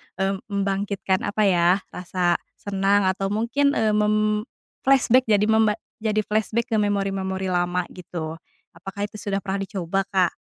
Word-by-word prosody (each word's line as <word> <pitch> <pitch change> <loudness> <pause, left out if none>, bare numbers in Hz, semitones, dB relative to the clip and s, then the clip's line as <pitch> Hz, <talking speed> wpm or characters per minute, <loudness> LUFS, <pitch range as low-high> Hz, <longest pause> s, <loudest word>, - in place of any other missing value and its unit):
eee, 195 0 -1
membangkitkan 195 -1 -1
apa 210 +1 0
ya 175 -3 +4 0.2
rasa 180 -1 0 0.2
senang 200 0 +1
atau 195 +1 -3
mungkin, 235 +8 +1
eee, 220 -1 +2
mem-flashback 215 +4 +1
jadi 210 -1 +4
memba 220 -1 +3 0.2
jadi 215 -1 0
flashback 220 +3 -1
ke 220 - +1
memori-memori 195 -2 -1
lama 175 0 +1
gitu. 165 -3 -6 0.4
Apakah 195 +4 -5
itu 215 - -10
sudah 200 -2 -2
pernah 195 +1 -2
dicoba, 195 0 -2
Kak? 185 -3 +2
200 Hz, 140 wpm, -23 LUFS, 190-215 Hz, 0.4 s, ya